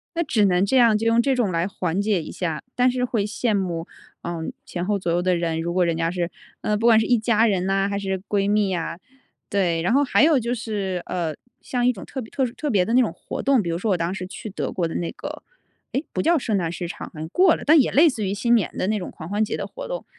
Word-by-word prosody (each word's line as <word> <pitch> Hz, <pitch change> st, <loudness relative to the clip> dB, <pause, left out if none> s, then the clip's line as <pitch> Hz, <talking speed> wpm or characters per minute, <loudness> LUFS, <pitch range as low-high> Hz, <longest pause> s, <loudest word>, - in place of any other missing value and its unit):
那 340 Hz, -, +1 dB
只 220 Hz, -8 st, +2 dB
能 185 Hz, +1 st, +3 dB
这 260 Hz, +6 st, +2 dB
样 230 Hz, -3 st, +5 dB
就 225 Hz, -, -3 dB
用 230 Hz, +1 st, +4 dB
这 270 Hz, +1 st, +1 dB
种 225 Hz, -7 st, +1 dB
来 170 Hz, +2 st, 0 dB
缓 185 Hz, -1 st, -2 dB
解 205 Hz, -5 st, +1 dB
一 -, -, -8 dB
下， 165 Hz, -4 st, -3 dB
但 250 Hz, 0 st, +4 dB
是 250 Hz, 0 st, 0 dB
会 225 Hz, -5 st, -1 dB
羡 220 Hz, +1 st, -1 dB
慕， 175 Hz, -4 st, -2 dB, 0.4 s
嗯， 170 Hz, -2 st, -4 dB
前 175 Hz, 0 st, -4 dB
后 205 Hz, 0 st, +1 dB
左 180 Hz, -3 st, -2 dB
右 175 Hz, +1 st, +1 dB
的 180 Hz, 0 st, +2 dB
人， 165 Hz, -1 st, -1 dB
如 170 Hz, +1 st, -2 dB
果 180 Hz, -1 st, +3 dB
人 165 Hz, -1 st, 0 dB
家 165 Hz, 0 st, 0 dB
是 175 Hz, -1 st, -2 dB, 0.3 s
呃， 210 Hz, -, 0 dB
不 225 Hz, -, -2 dB
管 225 Hz, -1 st, +7 dB
是 220 Hz, -, +1 dB
一 245 Hz, -, +3 dB
家 225 Hz, 0 st, +3 dB
人 190 Hz, -4 st, +1 dB
呐 195 Hz, 0 st, +1 dB
还 200 Hz, 0 st, -2 dB
是 190 Hz, -1 st, -2 dB
闺 200 Hz, -1 st, +1 dB
蜜 210 Hz, -2 st, +2 dB
呀， 175 Hz, -1 st, -3 dB, 0.5 s
对。 175 Hz, -5 st, +1 dB
然 185 Hz, +8 st, +1 dB
后 285 Hz, +1 st, +4 dB
还 275 Hz, -, +3 dB
有 310 Hz, -3 st, +5 dB
就 235 Hz, +1 st, -2 dB
是， 200 Hz, -5 st, -3 dB
呃， 165 Hz, -4 st, -2 dB, 0.3 s
像 245 Hz, -1 st, -1 dB
一 250 Hz, -, +4 dB
种 195 Hz, -, -9 dB
特 265 Hz, -, -5 dB
别 220 Hz, -, -10 dB
特 265 Hz, -, 0 dB
殊 235 Hz, -, -5 dB
特 295 Hz, +2 st, -3 dB
别 195 Hz, -4 st, +3 dB
的 230 Hz, -, -2 dB
那 255 Hz, -, +6 dB
种 230 Hz, -, 0 dB
活 -, -, -6 dB
动， 270 Hz, -3 st, +3 dB
比 175 Hz, -, -4 dB
如 165 Hz, -, -1 dB
说 205 Hz, +3 st, -1 dB
我 185 Hz, -, +2 dB
当 170 Hz, +2 st, -1 dB
时 185 Hz, -, -5 dB
去 205 Hz, +3 st, -8 dB
德 195 Hz, -, -3 dB
国 175 Hz, -3 st, -1 dB
的 -, -, -6 dB
那 170 Hz, -, -2 dB
个 -, -, -8 dB, 0.5 s
诶， 270 Hz, -, -1 dB
不 -, -, 0 dB
叫 335 Hz, 0 st, +3 dB
圣 220 Hz, -5 st, 0 dB
诞 170 Hz, -3 st, -1 dB
市 175 Hz, 0 st, -4 dB
场， -, -, -7 dB
好 -, -, -36 dB
像 160 Hz, -, -4 dB
过 360 Hz, -, +4 dB
了， -, -, -8 dB
但 310 Hz, +1 st, +7 dB
也 255 Hz, -, +2 dB
类 315 Hz, +4 st, +6 dB
似 220 Hz, -6 st, -3 dB
于 190 Hz, -, -1 dB
新 235 Hz, +4 st, +2 dB
年 210 Hz, -, 0 dB
的 185 Hz, -, 0 dB
那 215 Hz, -, +1 dB
种 185 Hz, -, -6 dB
狂 160 Hz, +2 st, -9 dB
欢 210 Hz, +2 st, +1 dB
节 -, -, -3 dB
的 -, -, -4 dB
活 -, -, -8 dB
动。 -, -, -5 dB
200 Hz, 310 characters per minute, -23 LUFS, 175-235 Hz, 0.5 s, 管